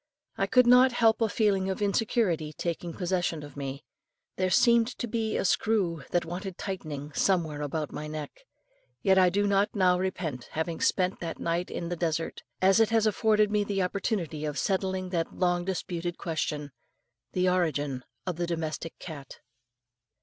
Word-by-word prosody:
I 195 - 0
could 250 +4 +5
not 250 +1 +6
help 225 -1 +3
a 225 - +3
feeling 200 -3 +1
of 190 - -2
insecurity 200 -6 +1
taking 170 +2 -3
possession 175 -3 -1
of 145 -2 -11
me; 140 0 -5 0.5
there 185 0 0
seemed 235 +4 +5
to - - -2
be 220 -1 -1
a - - -1
screw 185 -6 +1
that 175 - +1
wanted 180 +2 -5
tightening 150 -7 -5
somewhere 160 -6 +1
about 150 +1 -3
my 150 - -5
neck. 150 -1 -5 0.7
Yet 190 -1 +5
I 185 -1 +6
do 205 +3 +1
not 200 +1 +2
now 180 -2 +4
repent 170 -9 -3
having 160 +1 -2
spent 185 0 +1
that 165 -1 -5
night 170 +1 -1
in 170 - -4
the 175 - -2
desert, 165 -1 -2 0.2
as 195 +3 +6
it 225 - +4
has 225 -1 +3
afforded 215 -1 +3
me 210 -1 +2
the 200 -2 -1
opportunity 180 -5 -2
of 150 -1 -3
settling 190 +3 -1
that 170 -2 -2
long 175 -1 +1
disputed 175 -2 -3
question 150 -3 -3 0.6
the 185 0 +2
origin 145 -7 0 0.2
of 180 -3 -3
the 175 0 -1
domestic 165 -1 -4
cat. 145 -6 -9
180 Hz, 170 wpm, -28 LUFS, 160-200 Hz, 0.7 s, not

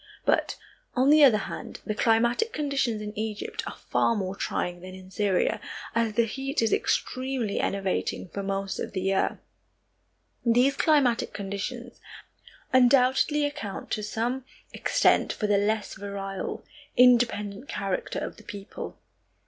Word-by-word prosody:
But, - - +2 0.4
on 260 +3 +4
the 305 0 +7
other 250 -6 +7
hand, 205 - -6
the 215 - -1
climatic 235 - +2
conditions 270 -7 -1
in 210 0 -6
Egypt 220 - -3
are - - -6
far 230 - +3
more 190 -2 -2
trying 175 -3 -2
than 185 +1 -9
in 185 0 -13
Syria, 205 +2 +1 0.3
as 230 -1 +1
the 235 +2 +3
heat 270 +5 -3
is 225 - +2
extremely 255 -5 -1
enervating 195 -1 -1
for 200 - -4
most 195 0 -3
of - - -4
the 190 - -2
year. 195 +1 +1 1.1
These 245 +3 +4
climatic 280 -7 +2
conditions 210 +5 -5 0.7
undoubtedly 260 +3 +4
account 290 -9 -5
to 215 - 0
some 235 +5 -2 0.3
extent - - +3
for 215 - -3
the 205 -1 +3
less 215 +1 0
virile, 195 -1 -5 0.3
independent 240 -2 +4
character 195 -2 -2
of - - -4
the - - -14
people. 200 -1 -8
220 Hz, 140 wpm, -27 LUFS, 200-255 Hz, 1.1 s, the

